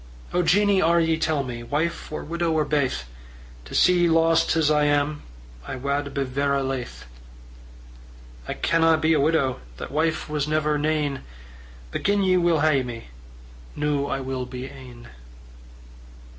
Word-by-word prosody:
"O 180 - +2
Jeannie, 200 +2 +3
are 170 +1 +4
ye, 165 -1 +2
tell 155 -2 0
me, 120 -2 -6
Wife 150 +9 -3
or 155 - -5
widow 170 +1 -1
or 155 -1 +1
baith? 140 - 0 0.6
To - - -8
see 180 0 +4
ye 175 -1 +3
lost 165 0 +3
as 155 -2 +3
I 150 -1 +3
am, 145 +1 +1 0.5
I - - -4
wad 140 +2 -2
be 140 0 -1
verra 140 +1 0
laith," 130 - -5 1.4
"I - - -3
canna 165 -1 +3
be 160 +1 +2
a - - +2
widow 140 -3 +1 0.2
That - - -7
wife 155 +2 0
was 150 -2 -2
never 150 -1 0
nane; 150 -2 -1 0.7
But - - -3
gin 205 0 +2
ye 185 -1 +3
will 170 -3 +2
hae 155 -3 +3
me, 120 - -7 0.7
Noo 145 -1 -1
I 135 - -2
will 130 -1 -4
be 125 0 -7
ane." 130 -3 -12
150 Hz, 160 wpm, -24 LUFS, 135-165 Hz, 1.4 s, are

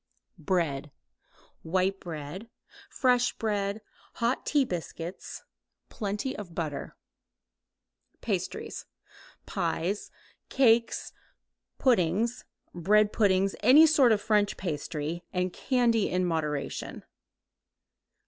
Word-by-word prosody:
Bread. 150 -4 -1 0.7
White 185 +3 0
bread, 170 +6 -7 0.4
fresh 250 -2 +2
bread, 205 -1 -2 0.3
hot 235 +2 -1
tea 290 -3 +3
biscuits, 175 -2 -6 0.5
plenty 210 +4 -3
of 175 -5 -8
butter. 155 -4 -4 1.2
Pastries. - - -4 0.6
Pies, 195 +5 -2 0.4
cakes, 235 -3 +2 0.6
puddings, 230 - +1 0.3
bread 210 +5 +3
puddings, 195 -2 +2
any 295 +5 +8
sort 290 -6 +5
of 215 - +3
French 210 -1 +1
pastry, 160 0 -4
and 180 -1 -1
candy 235 -5 +1
(in 180 0 +1
moderation). 150 -4 -3
195 Hz, 85 wpm, -28 LUFS, 170-230 Hz, 1.2 s, any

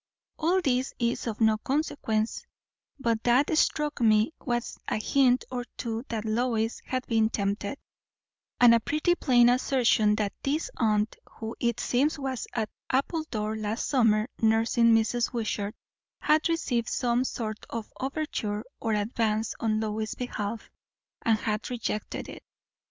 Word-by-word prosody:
All 350 +4 +2
this 260 -4 0
is 235 0 -1
of 220 -2 -3
no 220 -1 +3
consequence; 230 -6 -1 0.5
but 230 -5 0
what 260 +6 +3
struck 300 -2 +1
me 215 +4 +4
was 240 -2 -2
a - - 0
hint 250 +2 +3
or 250 -1 -2
two 230 -1 -3
that 225 -1 -3
Lois 225 0 0
had 255 -1 -2
been 220 -2 +2
tempted; 200 +3 -2 0.8
and 245 -1 +8
a 230 - +5
pretty 305 +8 +1
plain 245 -8 +4
assertion 245 -4 +3
that 210 -2 -1
this 295 +4 -1
aunt, 215 -1 +1 0.2
who 225 +1 -6
it 235 -1 0
seems 275 +7 +1
was 265 -3 -3
at 220 -3 -2 0.2
Appledore 260 -6 -1
last 215 +2 -2
summer 225 -5 +3
nursing 225 +1 +3
Mrs. 230 +2 +1
Wishart, 215 -3 -2 0.4
had 310 +2 +3
received 245 -8 0
some 245 -1 +1
sort 220 -4 -4
of 230 -2 -6
overture 260 -7 -2 0.2
or 225 - -1
advance 215 0 0
on 215 -1 +1
Lois's 215 0 -2
behalf, 225 -3 -4 0.5
and 225 -1 +3
had 215 0 -2
rejected 230 -3 -3
it. - - -9
230 Hz, 140 wpm, -28 LUFS, 215-255 Hz, 0.8 s, and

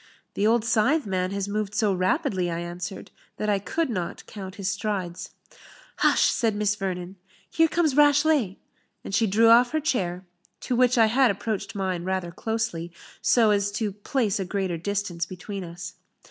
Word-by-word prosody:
"The 205 - +1
old 230 0 +2
scythe 255 +7 +2
man 185 -2 -1
has 200 0 -3
moved 210 0 -3
so 210 -3 +2
rapidly," 185 0 0
I 165 - -2
answered, 175 +2 -6 0.3
"that 210 - -2
I 200 -1 +2
could 315 - -1
not 185 -8 -4
count 190 -3 -8
his 195 -2 -4
strides." 190 -3 -3 0.6
"Hush!" - - +3
said 225 -3 +2
Miss 205 -1 +1
Vernon, 185 -1 -4 0.3
"here 325 0 +4
comes 315 -4 +1
Rashleigh;" 290 -7 +4 0.5
and - - -7
she 220 +3 +3
drew 225 +4 +4
off 240 +4 +6
her 315 - +2
chair, 190 - -1 0.4
to 250 - -1
which 250 0 +3
I 225 - +7
had 250 +3 +4
approached 200 -1 -3
mine 185 -3 -2
rather 185 -1 -2
closely, 220 -5 -3 0.3
so 225 -3 +4
as 205 0 +1
to 210 -1 -1
place 210 +1 -1
a - - 0
greater 185 -2 -2
distance 180 -2 -2
between 190 +2 -7
us. 175 +1 -8
200 Hz, 175 wpm, -25 LUFS, 185-230 Hz, 0.6 s, I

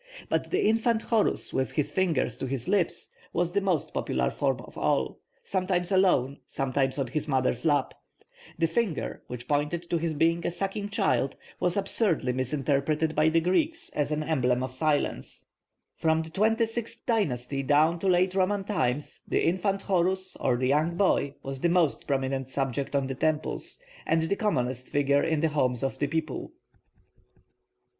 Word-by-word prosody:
But - - 0
the - - +1
infant 225 +1 +2
Horus 225 -3 +1
with 130 -1 -1
his 150 -1 0
finger 170 -5 +1
to 130 +3 -5
his 130 -2 -3
lips 195 -5 0 0.2
was 175 0 0
the 200 +2 +1
most 185 -6 0
popular 65 -1 0
form - - 0
of - - -14
all, 65 -1 0 0.2
sometimes 185 -1 -1
alone, 175 -8 +3
sometimes 135 0 -1
on 135 - 0
his 150 +5 -3
mother's 130 -1 0
lap. 145 -4 +2 0.6
The 165 - +2
finger, 170 - -1
which 125 0 -7
pointed 150 +4 -1
to 170 - +2
his 160 -1 -2
being 165 +3 +2
a - - 0
sucking 195 +3 -3
child, 195 - +1 0.2
was 180 +1 +1
absurdly 175 - +1
misunderstood 140 +4 0
by 155 +1 +3
the 165 +1 +3
Greeks 305 - 0
as 145 0 -1
an 155 0 0
emblem 125 -5 +1
of 130 -1 -4
silence. 145 +2 -1 0.5
From 160 0 +2
the 160 - -10
twenty 220 +5 +2
sixth 225 0 -6
dynasty 140 - 0
down 150 +5 +3
to 195 - -2
late 185 0 +3
Roman 195 +1 +1
times 145 - -2
the - - +1
infant 195 +3 0
Horus, 185 0 0
or 125 -2 +1
the 130 +1 0
young 155 +4 +2
boy, 145 -7 +2
was 135 -1 -5
the 170 - +3
most 170 -3 +1
prominent 135 -1 -1
subject 135 +1 -2
on 140 -1 +2
the 135 - -3
temples, 155 +3 -2 0.3
and 165 0 +2
the 160 +5 0
commonest 130 - -1
figure 140 0 +2
in 160 -2 0
the 160 - +2
homes 130 -5 0
of 135 0 -2
the 145 - +1
people. 155 -2 -3
155 Hz, 170 wpm, -27 LUFS, 135-185 Hz, 0.6 s, alone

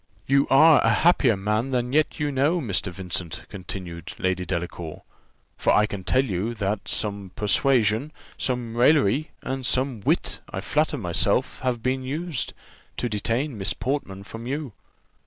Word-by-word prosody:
"You 140 +1 +3
are 155 +3 +7
a 115 - +4
happier 125 - +4
man 105 +6 0
than 125 -1 -1
you - - +4
yet - - -14
know, 145 +7 +2
Mr. 100 - -1
Vincent," 90 -2 -5
continued 90 -2 -7
Lady 95 -4 -1
Delacour; 85 -2 -4 0.5
"for - - +2
I 105 - +5
can 100 -2 -6
tell 130 +7 +2
you, 105 +2 -2
that 100 -1 -2
some 100 -2 -2
persuasion, 115 +3 +2 0.2
some 120 -3 -2
raillery, 140 +2 +3
and 135 0 -3
some 130 -2 0
wit, - - +1
I - - -3
flatter 150 +8 0
myself, 100 +5 +1
have 125 -3 -2
been 130 +1 0
used, 150 +2 -2 0.4
to 120 - -1
detain 115 +4 -1
Miss 100 +2 +1
Portman 110 -8 -3
from 115 +3 -8
you." 140 -3 -3
115 Hz, 155 wpm, -25 LUFS, 100-135 Hz, 0.5 s, are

